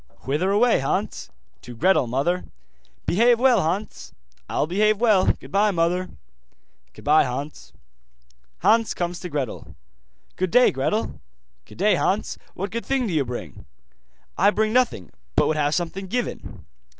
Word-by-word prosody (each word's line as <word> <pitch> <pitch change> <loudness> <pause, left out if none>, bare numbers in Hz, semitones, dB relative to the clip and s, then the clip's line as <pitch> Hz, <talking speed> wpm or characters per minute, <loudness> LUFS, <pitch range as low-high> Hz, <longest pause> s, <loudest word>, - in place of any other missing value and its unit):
'Whither 150 +8 -1
away, 225 +4 +3
Hans?' 135 - -2 0.3
'To 120 - -10
Gretel, 180 0 +2
mother.' 145 +9 -1 0.6
'Behave 235 +5 +3
well, 250 -4 +4
Hans.' 185 +7 -4 0.3
'I'll - - 0
behave 210 +6 +2
well. 215 -5 +3
Goodbye, 205 +2 +1
mother.' 180 0 0 0.8
'Goodbye, 150 +2 +3
Hans.' 140 +4 -6 0.9
Hans 225 -2 +3
comes 175 0 -3
to 180 - -7
Gretel. 140 -6 -5 0.6
'Good 185 0 0
day, 250 +8 +5
Gretel.' 135 - -2 0.4
'Good - - -15
day, - - +3
Hans. - - -1 0.2
What 195 +3 -4
good 230 +1 -4
thing 270 -2 0
do 195 - -3
you 150 -3 +2
bring?' 120 - -8 0.7
'I 200 - +6
bring 215 +1 0
nothing, 240 - +1 0.2
but - - +4
would 155 - +1
have 145 0 +1
something 180 +3 -3
given. 245 +5 -5
185 Hz, 140 wpm, -23 LUFS, 150-215 Hz, 0.9 s, I